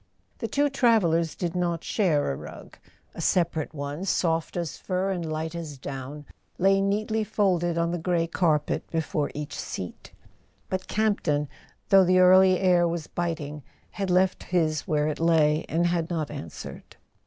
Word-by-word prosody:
The - - -2
two 290 +1 +2
travellers 195 - +2
did 175 -1 -3
not 170 -2 -1
share 165 - +1
a - - -3
rug: - - -11 0.3
a - - -7
separate 170 -3 +1
one, 145 +2 -5
soft 165 -3 0
as 170 -3 -4
fur 185 +1 -1
and 180 -3 -2
light 160 +1 -3
as 160 -4 -6
down, 140 +2 -7 0.3
lay 195 +1 +3
neatly 215 +2 0
folded 185 -6 +1
on 170 0 +1
the 175 - -2
grey 170 0 +1
carpet 160 -3 0
before 155 -2 -1
each 150 -1 -5
seat; 90 - -7 0.6
but 185 0 -2
Campton, 175 -9 0 0.4
though 195 -1 +7
the 185 0 +3
early 185 0 +6
air 180 -2 +4
was 165 -2 -3
biting, 150 -4 -4 0.3
had 195 -2 -3
left 185 +1 +2
his 160 -4 0
where 150 -1 +1
it 155 - -3
lay, 160 -2 +3
and 170 +2 +1
had 170 -1 0
not 160 -4 -2
answered. 80 - -9
170 Hz, 160 wpm, -26 LUFS, 155-185 Hz, 0.6 s, though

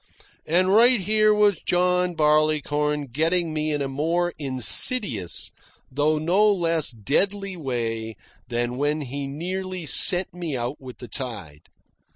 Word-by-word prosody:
And 185 +4 +2
right 240 +2 +5
here 215 +2 +2
was 210 -2 +2
John 180 0 0
Barleycorn 150 -2 0
getting 165 +3 0
me 155 0 -2
in 145 -1 -2
a - - -3
more 165 +6 -1
insidious 130 - +1 0.4
though 150 +3 +1
no 185 +7 +2
less 165 -5 0
deadly 190 - -2
way 115 -7 -4 0.3
than 120 +1 -3
when 145 +2 -1
he 140 +1 -5
nearly 185 +4 -5
sent 180 +4 +4
me 170 -6 -5
out 120 +4 -5
with 130 -2 -11
the 125 - -10
tide. 105 - -7
155 Hz, 135 wpm, -23 LUFS, 135-180 Hz, 0.4 s, right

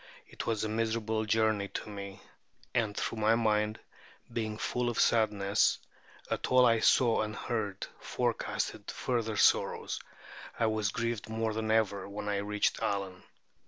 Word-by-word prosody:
It - - -7
was 110 -2 0
a - - 0
miserable 110 0 -1
journey 110 -2 +2
to - - -6
me; 100 -1 -7 0.5
and 110 -4 0
though 115 - -2
my 110 +1 +4
mind, 110 -1 +1 0.5
being 110 -2 -2
full 125 +2 -1
of 120 - -2
sadness 105 -3 +3 0.5
at - - -1
all 130 0 +6
I 115 -1 +4
saw 120 +1 +4
and 110 0 -3
heard, 105 -5 -3
forecasted - - -2
further 115 -4 -1
sorrows, - - +2 0.6
I 115 - +2
was 110 -2 +1
grieved 115 0 -3
more 110 0 -1
than 110 0 -2
ever 100 -3 +1
when 105 +1 -6
I 100 - 0
reached 105 +1 0
Allen. 95 -2 -2
110 Hz, 150 wpm, -31 LUFS, 105-115 Hz, 0.6 s, all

